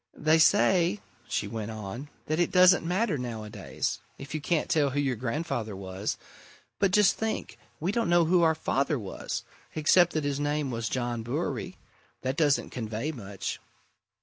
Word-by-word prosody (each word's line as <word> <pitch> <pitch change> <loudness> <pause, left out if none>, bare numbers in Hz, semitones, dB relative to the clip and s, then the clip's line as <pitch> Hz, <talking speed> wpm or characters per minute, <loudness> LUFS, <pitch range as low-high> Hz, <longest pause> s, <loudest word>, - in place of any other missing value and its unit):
"They 155 +1 +4
say," 185 +1 +4 0.3
she - - -1
went 110 0 -4
on, 110 +6 -6 0.2
"that 155 +2 -1
it 175 - +3
doesn't 180 -1 +6
matter, 180 - 0
nowadays, 110 -4 -4 0.2
if 140 +2 -9
you 155 - -2
can't 160 +1 0
tell 145 -3 +2
who 140 +2 -1
your 135 -3 +1
grandfather 120 - -3
was 95 +1 -4 0.6
but, 200 - +4
just 210 +2 +4
think, 220 0 -3 0.2
we 175 +5 0
don't 230 -3 0
know 175 -1 +5
who 175 +2 +4
our 160 -1 +4
father 145 -1 0
was 100 -6 -5 0.3
except 175 +3 +4
that 155 - 0
his 145 -1 -1
name 145 -1 -1
was 115 -2 -2
John 120 -2 -2
Bewery. 160 +9 -3 0.5
That 130 +1 -1
doesn't 145 -2 +2
convey 115 +4 -3
much." 100 -8 -5
145 Hz, 165 wpm, -28 LUFS, 115-170 Hz, 0.6 s, doesn't